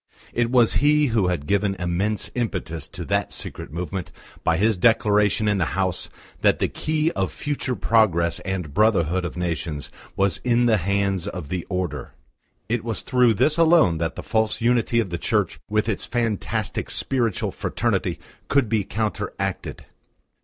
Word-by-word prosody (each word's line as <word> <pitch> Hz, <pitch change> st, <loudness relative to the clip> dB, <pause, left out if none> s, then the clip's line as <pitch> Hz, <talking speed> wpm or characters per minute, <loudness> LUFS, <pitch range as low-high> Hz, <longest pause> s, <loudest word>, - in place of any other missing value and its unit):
It 120 Hz, -1 st, +1 dB
was 120 Hz, -2 st, +4 dB
he 150 Hz, +1 st, +4 dB
who 105 Hz, -5 st, +3 dB
had 85 Hz, -5 st, -1 dB
given 100 Hz, +3 st, +1 dB
immense 95 Hz, +4 st, -1 dB
impetus 90 Hz, -, -3 dB
to -, -, -8 dB
that -, -, 0 dB
secret -, -, -5 dB
movement 90 Hz, +2 st, -4 dB, 0.3 s
by 80 Hz, -, +2 dB
his 110 Hz, +3 st, +3 dB
declaration 105 Hz, 0 st, +3 dB
in 105 Hz, -1 st, +2 dB
the 85 Hz, -, -1 dB
House 95 Hz, -2 st, 0 dB, 0.3 s
that -, -, +4 dB
the -, -, +1 dB
key 155 Hz, +1 st, -1 dB
of 95 Hz, -4 st, -1 dB
future 140 Hz, -, -3 dB
progress 95 Hz, -6 st, +2 dB
and 90 Hz, -6 st, -4 dB
brotherhood 95 Hz, -4 st, +2 dB
of 90 Hz, -, -5 dB
nations 85 Hz, -4 st, -3 dB, 0.2 s
was 100 Hz, -2 st, +2 dB
in 120 Hz, -1 st, +2 dB
the 115 Hz, -2 st, +4 dB
hands 100 Hz, 0 st, 0 dB
of 90 Hz, -8 st, -6 dB
the 90 Hz, -1 st, -3 dB
Order. 90 Hz, -2 st, -3 dB, 0.5 s
It 115 Hz, 0 st, -1 dB
was 115 Hz, -3 st, -2 dB
through 125 Hz, -3 st, +3 dB
this 155 Hz, +10 st, +2 dB
alone 160 Hz, -, +5 dB
that 80 Hz, 0 st, -2 dB
the -, -, -7 dB
false 110 Hz, -1 st, 0 dB
unity 120 Hz, 0 st, +2 dB
of 110 Hz, -6 st, -1 dB
the 85 Hz, -, -3 dB
Church -, -, 0 dB
with 105 Hz, +1 st, +1 dB
its 110 Hz, -, -1 dB
fantastic 115 Hz, -4 st, -2 dB
spiritual 120 Hz, -7 st, 0 dB
fraternity -, -, -1 dB, 0.3 s
could 140 Hz, -6 st, +2 dB
be 110 Hz, -2 st, +1 dB
counteracted. 105 Hz, -2 st, -3 dB
105 Hz, 160 wpm, -23 LUFS, 90-115 Hz, 0.5 s, alone